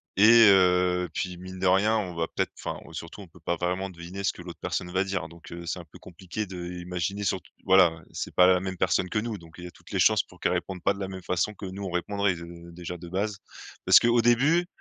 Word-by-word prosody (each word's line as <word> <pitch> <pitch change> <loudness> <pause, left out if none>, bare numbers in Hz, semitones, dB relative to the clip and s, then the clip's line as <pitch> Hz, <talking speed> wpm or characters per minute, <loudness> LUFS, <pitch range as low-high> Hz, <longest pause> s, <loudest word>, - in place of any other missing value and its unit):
et 110 +2 +8
heu, 90 -2 +3
puis 90 -2 -3
mine 95 +1 -9
de 95 - +1
rien 105 +4 +4
on 90 -5 -3
va 80 0 -1
peut-être, - - -2
enfin - - -5
on 80 - -13
surtout 85 +4 -8
on 95 - -11
peut 85 - -19
pas 85 +2 -1
vraiment 90 +3 -2
deviner 90 +3 -8
ce - - +2
que - - -12
l'autre 85 -1 -10
personne 90 0 -3
va 95 +1 +2
dire. 95 -4 -3
Donc, 85 0 -14
heu, 85 0 -7
c'est 90 +2 -3
un 85 - -10
peu - - -14
compliqué 95 +4 -6
d'imaginer 90 +1 -4
surtout 95 0 -2
voilà, 95 -3 +6
ouais, 80 - -13
c'est - - -5
pas 90 0 +6
la 90 -1 +5
même 95 -1 -4
personne 90 +1 +1
que 105 - 0
nous 110 -2 -4
donc 80 -1 -15
il 90 - -9
y - - -5
a - - -11
toutes - - -18
les - - -1
chances - - +4
pour - - -19
qu'elle - - +1
réponde 90 -2 -3
pas 100 - +3
de 100 - -10
la 95 - -2
même 95 -1 -7
façon 90 +4 -1
que 100 - -9
nous 95 +2 -6
on 95 - -4
répondrait, 100 +2 0
de 85 0 -10
déjà 90 +1 -7
de 85 0 -10
base. 100 +2 -2 0.5
Parce - - +8
qu'au 120 0 +3
début, 145 +10 +3
90 Hz, 265 wpm, -27 LUFS, 85-100 Hz, 0.5 s, et